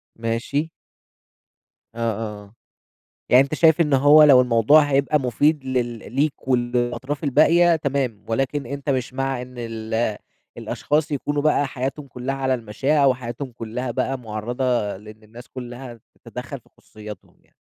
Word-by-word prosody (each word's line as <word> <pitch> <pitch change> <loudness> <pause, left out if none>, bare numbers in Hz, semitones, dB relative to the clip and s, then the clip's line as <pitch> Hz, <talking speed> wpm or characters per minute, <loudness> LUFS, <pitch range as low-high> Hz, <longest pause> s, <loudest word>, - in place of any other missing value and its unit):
ماشي. 115 +7 -2 1.3
آه، - - -9
آه، 105 -1 -6
آه. 100 - -21 0.8
يعني 125 +2 +7
أنت 140 - -4
شايف 160 +1 +4
إن 150 -3 +2
هو 145 +3 +7
لو 140 -4 +7
الموضوع 125 +5 +5
هيبقى 145 +1 +1
مفيد 145 +4 +1
لل 120 -4 -3
ليك 140 -1 -1
والأطراف 125 +3 -1
الباقية، 165 +5 +4
تمام، 135 -8 -2
ولكن 135 +5 -1
أنت 140 0 -4
مش 130 -1 -2
مع 135 -1 -2
إن 125 0 -11
ال 110 -1 -2 0.4
الأشخاص 150 +1 -1
يكونوا 145 0 -2
بقى 150 -2 +2
حياتهم 135 +2 -5
كلّها 125 +2 -4
على 130 -1 0
المشاع، 135 +5 0
وحياتهم 125 0 -2
كلّها 120 +2 -5
بقى 130 +3 -2
مُعَرَضة 120 -1 -2
لإن 105 +2 -14
الناس 115 +3 -14
كلّها 125 -1 -9 0.2
تتدخل - - -7
في - - -28
خصوصياتهم 105 -3 -12
يعني. - - -34
130 Hz, 145 wpm, -22 LUFS, 115-140 Hz, 1.3 s, يعني